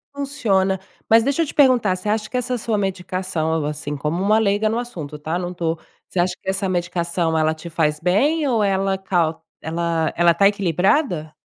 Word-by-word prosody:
funciona. 195 -10 0 0.3
Mas 225 +1 +6
deixa 280 +6 +1
eu - - 0
te - - -8
perguntar: 250 -9 +4
você 185 +3 -6
acha 215 0 0
que 255 - -3
essa 250 0 -1
sua 225 -2 -1
medicação, 185 -4 -2
algo 160 -2 0
assim 150 -1 -4
como 150 +5 -2
uma 210 +2 +4
leiga 215 0 +2
no 225 - -1
assunto, 165 -12 -6
tá? 160 +3 -3
Não 180 0 -4
tô 165 -2 -2 0.3
você 185 - -5
acha 180 +1 +2
que - - -10
essa 195 0 -2
medicação 175 -2 -1
ela 155 0 +2
te 160 +2 -9
faz 155 -2 0
bem 280 - +2
ou 230 -5 +2
ela 195 0 +1
cau 175 -4 -1 0.2
ela 165 0 -1
ela 175 0 +5
tá 195 +4 +5
equilibrada? 185 - 0
185 Hz, 200 wpm, -21 LUFS, 165-215 Hz, 0.3 s, Mas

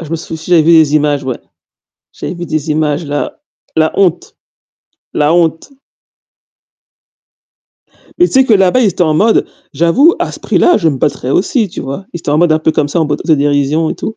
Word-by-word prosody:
Je 165 - -9
me 165 - -3
souviens, 160 0 -7
j'avais - - +4
des 160 -2 +4
images, 145 -2 +1
ouais. 130 -3 -4 0.7
J'avais 180 - -6
vu 175 - -6
des 155 -1 -3
images 150 +1 -1
là, 145 0 -4 0.3
la 160 0 +2
honte, 175 -3 0 0.8
la 150 +2 +1
honte. 165 - 0 2.5
Mais 355 - +5
tu - - -10
sais 265 -1 +4
que 240 - +1
là-bas, 195 +4 +3
ils 230 - +3
étaient 180 - -1
en 155 -1 0
mode: 215 +8 +2 0.3
«J'avoue, 245 - +3
à - - -3
ce - - -11
prix-là, 355 - +2
je 165 - +1
me 145 - -2
battrais 135 -1 -2
aussi», 210 - 0
tu - - -8
vois? 140 +9 -6
Ils 170 - -5
étaient 160 - -5
en 150 - +1
mode 175 -1 +3
un 155 - +2
peu 155 0 0
comme 145 - 0
ça 170 - -1
en 160 - +1
mode 145 - -3
auto-dérision 145 0 +1
et - - -3
tout. 220 - -6
160 Hz, 205 wpm, -13 LUFS, 150-180 Hz, 2.5 s, Mais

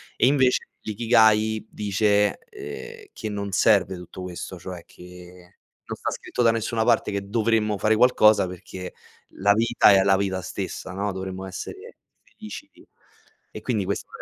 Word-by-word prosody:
e - - +3
invece 130 -2 +2
l'Ikigai 110 -1 +2
dice, 105 0 +1
ehm, 430 +1 -9
che 110 - -5
non 100 -1 -4
serve 100 -1 +3
tutto 90 +1 -10
questo, 90 0 -7
cioè 90 -1 -8
che 90 0 -15 0.3
non - - -5
sta - - -3
scritto - - -4
da 115 - +5
nessuna 115 0 -1
parte 115 -3 +2
che 100 0 -4
dovremmo 110 -1 +1
fare 110 +3 +2
qualcosa 110 -5 +5
perché 90 0 -8 0.4
la 100 +1 +3
vita 115 +3 +4
è 95 -1 +6
la 95 0 +4
vita 95 -1 -1
stessa, 90 - -6
no? 100 +2 -2
Dovremmo 95 0 -6
essere 390 - -8 0.3
felici 220 +6 -10
di - - -20 0.7
e - - -6
quindi - - -1
questo - - -3
105 Hz, 155 wpm, -24 LUFS, 95-115 Hz, 0.7 s, è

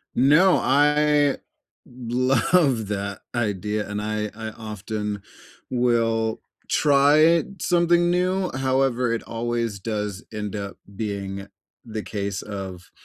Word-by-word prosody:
No. 150 +9 +5
I 145 +1 +3 0.5
love 125 - +1
that 100 -1 -4
idea, 105 -2 -1
and 105 0 -3
I 105 0 -2
I 110 0 -5
often 105 -1 -5 0.5
will 115 -2 +1 0.3
try 150 +3 +5 0.2
something 175 0 +3
new; 185 +1 +1
however, 130 -2 +1
it 115 - -3
always 115 -2 -2
does 105 -1 -4
end 105 -1 -4
up 100 -1 -5 0.2
being 100 -2 -4 0.4
the 110 -2 -5
case 100 -2 -3
of, 95 -4 -7
115 Hz, 105 wpm, -24 LUFS, 105-140 Hz, 0.5 s, No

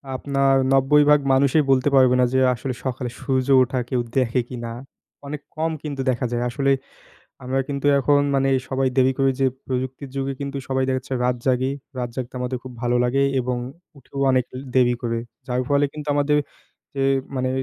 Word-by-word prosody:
আপনার 135 0 +1 0.2
৯০ 135 +2 +5
ভাগ 150 0 +6
মানুষই 140 +3 +3
বলতে 135 +2 +3
পারবে 130 -1 +5
না - - +5
যে, 130 - +3 0.2
আসলে 125 +2 -4
সকালে 130 -1 -3
সূর্য 130 -2 -1
ওঠা 130 0 0
কেউ 125 -2 0 0.2
দেখে 125 0 +2
কিনা? 120 -2 -6 0.6
অনেক 150 +1 -5 0.2
কম 160 +1 0
কিন্তু 145 -3 -4
দেখা 125 0 0
যায় 120 0 -1
আসলে, 135 +2 0 0.7
আমরা 130 +1 0
কিন্তু 140 0 -3
এখন 145 +1 +3
মানে 135 0 +2 0.2
সবাই 135 0 0
দেরি 130 0 +4
করে 135 0 +3
যে, 135 - +4 0.2
প্রযুক্তির 130 +2 -4
যুগে 135 0 -1
কিন্তু 140 0 -4
সবাই 130 0 +1
দেখাচ্ছে 130 0 -2
রাত 125 0 +1
জাগি, 130 +1 +2 0.3
রাত 125 -1 -2
জাগতে 130 -1 -5
আমাদের 125 0 -2
খুব 130 - -8
ভালো 120 0 +1
লাগে 130 +3 +1 0.2
এবং 125 0 -2 0.4
উঠেও 140 +1 -8
অনেক 130 -1 +2
লে - - -5 0.2
দেরি 125 -1 +4
করে। 115 -1 -1 0.3
যার 125 -1 -1
ফলে 145 0 +3
কিন্তু 150 -1 -7
আমাদের 145 +1 +2 0.6
যে, 135 - -1 0.3
মানে 130 0 0
130 Hz, 185 wpm, -22 LUFS, 125-140 Hz, 0.7 s, ভাগ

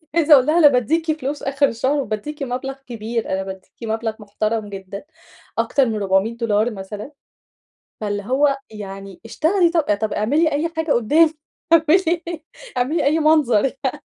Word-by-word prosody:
عايزة 320 -2 +5
أقول 265 -3 +7
لها 310 +3 +2
أنا 300 - +8
باديكِ 310 +6 +1
فلوس 285 +2 -4
آخر 280 +1 +2
الشهر، 265 +5 0
وباديكِ 275 +6 -5
مبلغ 265 +1 -4
كبير، 230 0 -4
أنا 190 0 -1
باديكِ 190 -1 -9
مبلغ 225 0 -2
محترم 215 +1 -3
جدًا، 195 +2 -8 0.5
أكتر 275 -2 +2
من 220 -2 -2
$400 215 +3 +1
مثلًا، 205 +5 -8 0.9
فاللي 205 -1 -2
هو 275 +5 +2
يعني 195 -2 -9
اشتغلي 335 - +2
طب 335 -2 +2 0.2
طب 220 0 -2
اعملي 295 +9 +1
أي 305 +4 0
حاجة 320 -2 0
قدامي 305 +8 +3 0.4
اعملي 330 +1 +4 0.5
اعملي 290 +6 0
أي 305 +3 +3
منظر 300 -9 +3
يعني. 270 0 -2
250 Hz, 150 wpm, -20 LUFS, 215-300 Hz, 0.9 s, أنا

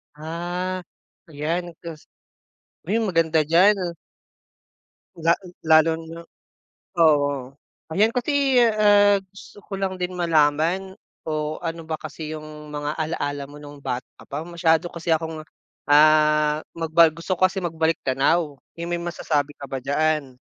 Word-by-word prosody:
Ah, 175 +4 -4 0.5
yan. 165 +4 -3
Kas 165 -3 -9 0.8
ay, 210 +5 +1
maganda 165 -4 +2
diyan. 180 +7 +5 1.4
La 165 +1 +3 0.3
lalo 160 0 +6 0.2
na 165 +1 -9 0.8
oo. 145 -4 +2 0.4
Ayan, 210 +7 +2
kasi 265 0 +2
ah, 205 -3 +5
gusto 195 +1 -15
ko - - -16
lang 190 -1 -2
din 180 0 -3
malaman 170 +2 +1 0.3
o 155 0 -2
ano 165 -1 -4
ba 160 -1 -4
kasi 155 -1 -7
yung 155 -1 -9
mga 145 0 -3
ala-ala 145 -3 -3
mo 145 - -12
nung 145 0 -11
bata 125 -1 -3
ka - - -15
pa, 140 - -6
masyado 170 -1 +1
kasi 170 0 -5
akong 160 -1 -1 0.5
ah, 150 0 +5
magba 165 0 +4
gusto 165 +4 -3
ko 185 - -9
kasi 190 - -5
magbalik 165 -3 0
tanaw 145 +4 +1 0.2
eh, 170 - -4
may 175 0 -2
masasabi 150 -4 -1
ka 140 - -7
ba 135 -1 -5
diyaan? 145 -1 0
160 Hz, 135 wpm, -23 LUFS, 150-175 Hz, 1.4 s, lalo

